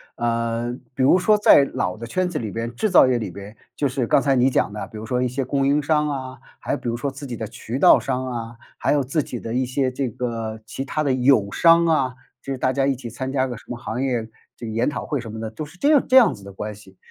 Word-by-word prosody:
呃， 115 0 -1 0.2
比 130 - -3
如 145 - +6
说 210 +3 +3
在 205 -8 +6
老 90 0 -2
的 115 - -7
圈 185 +9 -1
子 170 - -4
里 110 - -4
边， 115 +1 -4
制 215 - 0
造 180 - +7
业 125 -1 +2
里 110 -4 -4
边， 100 +3 -10 0.2
就 145 - 0
是 130 -2 -1
刚 135 - +4
才 140 -2 +2
你 130 +1 +4
讲 115 - +1
的， 105 - -6
比 110 - -11
如 110 - -7
说 125 +2 -1
一 125 - +1
些 130 +2 -2
供 135 +1 0
应 145 +2 +3
商 150 0 +2
啊， 130 -2 -5 0.2
还 - - -4
有 - - 0
比 - - -7
如 115 - -1
说 140 +4 -2
自 140 +2 -9
己 120 - -5
的 110 -1 -5
渠 115 +4 -6
道 - - +7
商 130 -1 -2
啊， 115 -1 -5 0.2
还 - - +1
有 145 -2 +2
自 145 +4 0
己 120 - -6
的 115 - -5
一 130 +1 +1
些 130 +1 -1
这 130 +1 -2
个 115 -2 -4
其 135 +4 -5
它 155 +2 -2
的 140 - +1
友 125 -5 +3
商 170 0 +5
啊， 140 -6 +1 0.3
就 135 - -4
是 - - -5
大 130 0 +1
家 135 0 +1
一 135 - +1
起 120 -2 -8
参 130 +3 -5
加 130 -1 +1
个 120 -3 -6
什 - - -15
么 120 - -5
行 120 +1 -4
业 120 -4 -1 0.3
这 120 - -9
个 110 - -5
研 115 +2 0
讨 - - -5
会 145 - -2
什 115 -3 -7
么 110 - -7
的， 110 -1 -4
都 150 +8 -6
是 175 +4 -16
这 285 - +2
样 295 -4 +4
这 260 - +2
样 245 - +6
子 100 - -13
的 100 - -10
关 105 +2 -5
系。 95 -2 -17
125 Hz, 315 characters per minute, -22 LUFS, 115-140 Hz, 0.3 s, 造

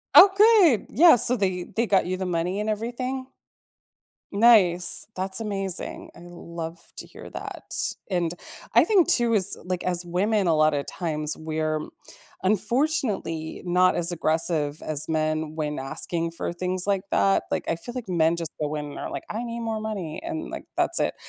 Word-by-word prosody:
Okay. 395 - +7
Yeah, 325 +4 +7
so 245 +2 +4
they 185 -5 -1
they 230 - +2
got 195 -3 +3
you 185 +1 -2
the 190 - -3
money 180 +2 -1
and 210 - -2
everything? 250 +4 -3 1.1
Nice. 200 -6 +5
That's 190 +3 -1
amazing. 195 -4 -4
I - - -15
love 170 -1 -8 0.2
to - - -7
hear - - -12
that, - - -8 0.4
and 175 -2 0 0.4
I - - +7
think 395 -6 +3
too 240 -9 +3
as 190 -4 +2
like, 180 +1 -3
as 180 -1 0
women, 195 +3 0
a 165 - +3
lot 155 0 +3
of 140 -1 -2
times 155 -3 -2
we're 155 0 -2 0.6
unfortunately 215 - -1
not 180 +1 +3
as 170 0 +1
aggressive 160 -2 -1
as 155 0 -1
men 155 0 -1
when 150 -2 -3
asking 165 +5 -2
for 170 - -4
things 185 +1 -1
like 200 -2 +1
that, 195 0 +2
like, - - -1
I 165 - 0
feel, 240 +9 -9
like, 250 -4 -5
men 170 -2 +2
just 165 -2 -5
go 150 0 -2
in 150 -1 -4
and - - -8
are - - -5
like, - - -6
"I 225 +3 -4
need 235 0 -5
more 225 -1 -3
money," 205 - -5
and, 330 -1 -5
like, - - -7
that's - - +1
it, - - 0
180 Hz, 180 wpm, -25 LUFS, 165-225 Hz, 1.1 s, Okay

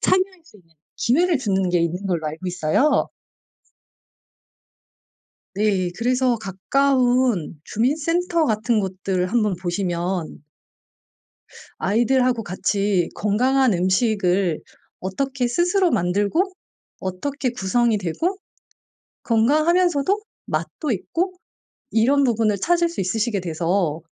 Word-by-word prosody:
참여할 375 -1 +1
수 325 - -19
있는 165 -2 -27 0.2
기회를 325 +6 +2
주는 195 -6 0
게 175 - +2
있는 175 +4 -2
걸로 170 -4 -1
알고 160 +5 -5
있어요. 180 - +1 2.5
네. 195 -3 +1
그래서 250 0 +1
가까운 245 - +1
주민 240 - 0
센터 335 +1 0
같은 220 +1 +1
곳들 190 -1 -2
한번 215 -5 +1
보시면 175 -2 -3 1.4
아이들하고 240 +3 +2
같이 195 -1 0
건강한 250 +3 +2
음식을 185 -2 +1 0.4
어떻게 255 +7 -2
스스로 350 +6 +2
만들고 205 - +1 0.5
어떻게 255 +9 -3
구성이 230 +1 +1
되고 320 - -2 0.9
건강하면서도 310 - +2 0.3
맛도 305 - -3
있고 345 - -2 0.6
이런 270 +5 +3
부분을 225 -4 +2
찾을 345 - +2
수 335 - -5
있으시게 210 +3 -1
돼서 170 -1 -1
220 Hz, 235 characters per minute, -22 LUFS, 185-275 Hz, 2.5 s, 이런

